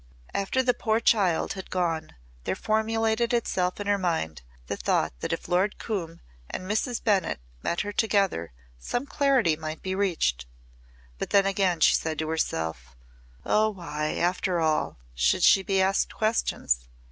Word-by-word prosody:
After 200 Hz, +7 st, 0 dB
the 250 Hz, -1 st, +3 dB
poor 220 Hz, -1 st, +1 dB
child 195 Hz, -8 st, +2 dB
had 190 Hz, -1 st, -8 dB
gone 165 Hz, -, -2 dB, 0.3 s
there -, -, 0 dB
formulated 225 Hz, +2 st, +1 dB
itself 185 Hz, -6 st, 0 dB
in 205 Hz, -, -4 dB
her 205 Hz, 0 st, +2 dB
mind 160 Hz, -, -1 dB, 0.2 s
the -, -, -3 dB
thought -, -, 0 dB
that -, -, -3 dB
if -, -, -3 dB
Lord 185 Hz, +4 st, +1 dB
Coombe 170 Hz, -7 st, -4 dB, 0.3 s
and -, -, -5 dB
Mrs. 220 Hz, +5 st, -1 dB
Bennett 195 Hz, -, +1 dB, 0.2 s
met 170 Hz, -, -1 dB
her 205 Hz, -, -3 dB
together 200 Hz, -, +1 dB, 0.3 s
some 245 Hz, -, -2 dB
clarity 270 Hz, -, +2 dB
might 155 Hz, 0 st, -6 dB
be 190 Hz, -, -2 dB
reached. 160 Hz, -, 0 dB, 0.7 s
But -, -, -3 dB
then 200 Hz, -1 st, +4 dB
again 190 Hz, -3 st, +1 dB
she -, -, +6 dB
said 160 Hz, -1 st, -1 dB
to 155 Hz, 0 st, -2 dB
herself, 80 Hz, -, -2 dB, 0.5 s
"Oh 215 Hz, +1 st, +3 dB
why, 155 Hz, -6 st, -3 dB
after 180 Hz, 0 st, 0 dB
all, 155 Hz, -, 0 dB, 0.2 s
should -, -, +2 dB
she 195 Hz, -, +7 dB
be 195 Hz, 0 st, 0 dB
asked 195 Hz, +1 st, +1 dB
questions? 215 Hz, -, 0 dB
190 Hz, 160 wpm, -27 LUFS, 160-215 Hz, 0.7 s, she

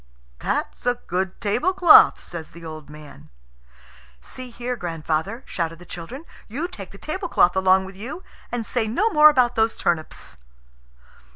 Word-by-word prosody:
"That's -, -, -3 dB
a 245 Hz, -, +3 dB
good 190 Hz, -5 st, -3 dB
tablecloth," 330 Hz, -, +5 dB
says 165 Hz, -2 st, -8 dB
the 170 Hz, 0 st, -12 dB
old 155 Hz, -2 st, -9 dB
man. 150 Hz, -, -13 dB, 0.9 s
"See 255 Hz, -, -8 dB
here, 245 Hz, +1 st, -4 dB
grandfather," 165 Hz, -, -3 dB
shouted 165 Hz, -1 st, -3 dB
the 175 Hz, -, -14 dB
children: 210 Hz, -, -8 dB, 0.2 s
"you 285 Hz, +11 st, -3 dB
take 195 Hz, -, -9 dB
the 195 Hz, -, -13 dB
tablecloth 310 Hz, -, +1 dB
along 190 Hz, 0 st, +4 dB
with 190 Hz, 0 st, -10 dB
you, 250 Hz, -, -7 dB, 0.3 s
and 240 Hz, -2 st, -3 dB
say 230 Hz, 0 st, -1 dB
no 370 Hz, -, +1 dB
more 305 Hz, -3 st, +8 dB
about 255 Hz, -4 st, +3 dB
those 225 Hz, -1 st, +1 dB
turnips." 165 Hz, -2 st, -3 dB
205 Hz, 150 wpm, -23 LUFS, 170-250 Hz, 0.9 s, more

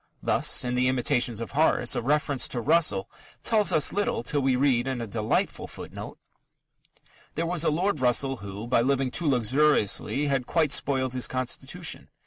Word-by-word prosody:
Thus, -, -, +1 dB
in 125 Hz, -, -2 dB
the 125 Hz, 0 st, +1 dB
Imitations 125 Hz, -2 st, +1 dB
of 115 Hz, -5 st, -6 dB
Horace, -, -, +2 dB
a -, -, -1 dB
reference 145 Hz, +1 st, 0 dB
to 120 Hz, -, -4 dB
Russell 135 Hz, -, +1 dB, 0.4 s
tells 215 Hz, -3 st, +3 dB
us 150 Hz, -, +2 dB
little 205 Hz, -, -1 dB
till 145 Hz, +3 st, 0 dB
we 130 Hz, -1 st, +2 dB
read 130 Hz, -2 st, +1 dB
in 130 Hz, -2 st, -2 dB
a 115 Hz, -, -4 dB
delightful 110 Hz, +1 st, -2 dB
footnote: -, -, -9 dB, 1.2 s
There 165 Hz, -, -1 dB
was 170 Hz, -1 st, 0 dB
a -, -, +2 dB
Lord 175 Hz, +2 st, 0 dB
Russell 130 Hz, +2 st, +1 dB
who, 100 Hz, +1 st, -8 dB
by 120 Hz, 0 st, +2 dB
living 135 Hz, 0 st, 0 dB
too 170 Hz, -, -1 dB
luxuriously, 135 Hz, +1 st, +1 dB
had 135 Hz, -3 st, -1 dB
quite 160 Hz, -4 st, +1 dB
spoiled 130 Hz, -3 st, +1 dB
his 125 Hz, -1 st, 0 dB
constitution. 130 Hz, -1 st, -3 dB
130 Hz, 170 wpm, -26 LUFS, 120-150 Hz, 1.2 s, tells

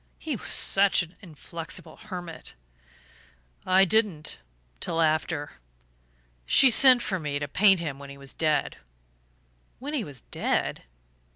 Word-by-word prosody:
He 310 Hz, -4 st, -4 dB
was -, -, -9 dB
such 195 Hz, -1 st, +4 dB
an 170 Hz, +2 st, -14 dB
inflexible 165 Hz, -1 st, -7 dB
hermit." 180 Hz, -5 st, -9 dB, 1.1 s
"I 190 Hz, +1 st, +5 dB
didn't 185 Hz, -, 0 dB, 0.4 s
till 165 Hz, -, -3 dB
after.... 155 Hz, -, -1 dB, 0.9 s
She 265 Hz, -, +6 dB
sent 255 Hz, 0 st, +7 dB
for 190 Hz, -2 st, -2 dB
me 150 Hz, -3 st, -3 dB
to 145 Hz, 0 st, -4 dB
paint 195 Hz, +4 st, +4 dB
him 145 Hz, -5 st, -5 dB
when 140 Hz, 0 st, -11 dB
he 140 Hz, -, -11 dB
was 140 Hz, -1 st, -10 dB
dead." 155 Hz, -2 st, -1 dB, 1.0 s
"When 285 Hz, +4 st, -7 dB
he 275 Hz, -7 st, -1 dB
was 140 Hz, -, -11 dB
dead? -, -, -2 dB
170 Hz, 130 wpm, -26 LUFS, 150-200 Hz, 1.1 s, sent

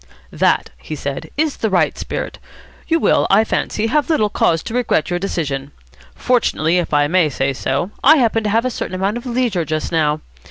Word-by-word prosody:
"That," -, -, +1 dB
he 155 Hz, -, -6 dB
said, 140 Hz, -1 st, -5 dB
"is 310 Hz, -1 st, 0 dB
the 220 Hz, -, -1 dB
right 185 Hz, -3 st, +2 dB
spirit. -, -, -5 dB, 0.5 s
You 330 Hz, 0 st, +2 dB
will, -, -, +3 dB
I 205 Hz, +3 st, +5 dB
fancy, 220 Hz, 0 st, -1 dB
have 295 Hz, +7 st, +1 dB
little 215 Hz, -10 st, +2 dB
cause 165 Hz, -5 st, +1 dB
to -, -, -6 dB
regret 235 Hz, -9 st, 0 dB
your 175 Hz, -, 0 dB
decision. 145 Hz, -7 st, -3 dB, 0.4 s
Fortunately, 180 Hz, -9 st, +1 dB
if 175 Hz, -, -3 dB
I 145 Hz, -1 st, +3 dB
may 165 Hz, 0 st, +2 dB
say 135 Hz, 0 st, -1 dB
so, 140 Hz, +7 st, -2 dB
I 310 Hz, +3 st, +7 dB
happen 225 Hz, -4 st, +2 dB
to -, -, +1 dB
have 225 Hz, +4 st, +1 dB
a 255 Hz, -, 0 dB
certain 185 Hz, -, -4 dB
amount 195 Hz, +4 st, -1 dB
of 240 Hz, +2 st, -8 dB
leisure 235 Hz, -8 st, 0 dB
just 155 Hz, 0 st, -3 dB
now. 155 Hz, -2 st, +1 dB
185 Hz, 200 wpm, -18 LUFS, 155-235 Hz, 0.5 s, I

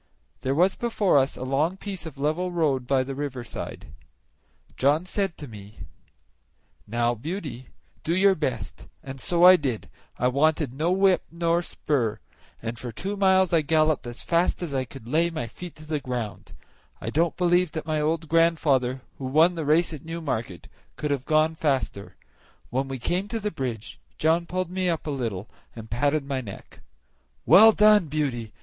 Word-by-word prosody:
There 130 Hz, +2 st, -1 dB
was 180 Hz, +5 st, +4 dB
before 210 Hz, -9 st, +2 dB
us 135 Hz, +1 st, -1 dB
a -, -, -5 dB
long 145 Hz, +8 st, 0 dB
piece 190 Hz, -5 st, -6 dB
of 145 Hz, -3 st, -10 dB
level 155 Hz, +6 st, -1 dB
road 145 Hz, -7 st, 0 dB
by 135 Hz, -1 st, +2 dB
the 135 Hz, +1 st, -5 dB
river 135 Hz, -3 st, -4 dB
side; -, -, -8 dB, 0.8 s
John 145 Hz, +6 st, +2 dB
said 195 Hz, -1 st, -2 dB
to 145 Hz, -, -8 dB
me, 105 Hz, -2 st, -12 dB, 1.1 s
"Now, 120 Hz, +2 st, +1 dB
Beauty, 135 Hz, -, -6 dB, 0.4 s
do 165 Hz, -, 0 dB
your 195 Hz, +1 st, +5 dB
best," 130 Hz, -, -4 dB, 0.2 s
and 135 Hz, -1 st, -8 dB
so 175 Hz, -1 st, +2 dB
I 185 Hz, 0 st, +10 dB
did; 130 Hz, -8 st, -3 dB, 0.3 s
I 125 Hz, -, +1 dB
wanted 150 Hz, +1 st, +1 dB
no 155 Hz, +6 st, 0 dB
whip 190 Hz, 0 st, +4 dB
nor 170 Hz, 0 st, +1 dB
spur, 125 Hz, -10 st, -1 dB, 0.5 s
and 115 Hz, +1 st, -4 dB
for 120 Hz, -1 st, -5 dB
two 195 Hz, -, -4 dB
miles 190 Hz, -2 st, +3 dB
I 165 Hz, -, +5 dB
galloped 155 Hz, -3 st, +1 dB
as 120 Hz, 0 st, -7 dB
fast 170 Hz, +1 st, +1 dB
as 160 Hz, -5 st, -4 dB
I 130 Hz, -1 st, 0 dB
could 120 Hz, -2 st, -12 dB
lay 165 Hz, +6 st, +2 dB
my 155 Hz, -8 st, -4 dB
feet 175 Hz, +8 st, -9 dB
to 155 Hz, -, -13 dB
the 155 Hz, -1 st, -2 dB
ground; 125 Hz, -6 st, -5 dB, 0.5 s
I 115 Hz, -, -4 dB
don't 165 Hz, +4 st, +1 dB
believe 175 Hz, -2 st, +2 dB
that 160 Hz, -, -4 dB
my 155 Hz, -1 st, -1 dB
old 160 Hz, +1 st, -1 dB
grandfather, 145 Hz, -6 st, +2 dB, 0.2 s
who 135 Hz, -, -5 dB
won 155 Hz, +7 st, +4 dB
the 165 Hz, -3 st, -4 dB
race 160 Hz, +3 st, +3 dB
at 150 Hz, -, -8 dB
Newmarket, 140 Hz, -, -4 dB, 0.3 s
could 150 Hz, -1 st, -3 dB
have 135 Hz, -2 st, -1 dB
gone 155 Hz, +1 st, +3 dB
faster. 135 Hz, -10 st, -2 dB, 0.6 s
When 135 Hz, +2 st, -1 dB
we 135 Hz, 0 st, -4 dB
came 180 Hz, +10 st, -1 dB
to 225 Hz, +2 st, -3 dB
the 210 Hz, -1 st, -2 dB
bridge 125 Hz, -8 st, -5 dB, 0.2 s
John 165 Hz, +2 st, +2 dB
pulled 185 Hz, 0 st, -3 dB
me 185 Hz, -1 st, 0 dB
up 165 Hz, -2 st, -2 dB
a 150 Hz, -, -2 dB
little 115 Hz, -7 st, -3 dB, 0.3 s
and 110 Hz, -1 st, -10 dB
patted 145 Hz, +5 st, +1 dB
my 135 Hz, -2 st, -2 dB
neck. 100 Hz, -5 st, -11 dB, 0.7 s
"Well 220 Hz, +3 st, +9 dB
done, 210 Hz, -4 st, +5 dB
Beauty! 135 Hz, -7 st, -2 dB
150 Hz, 180 wpm, -25 LUFS, 130-170 Hz, 1.1 s, I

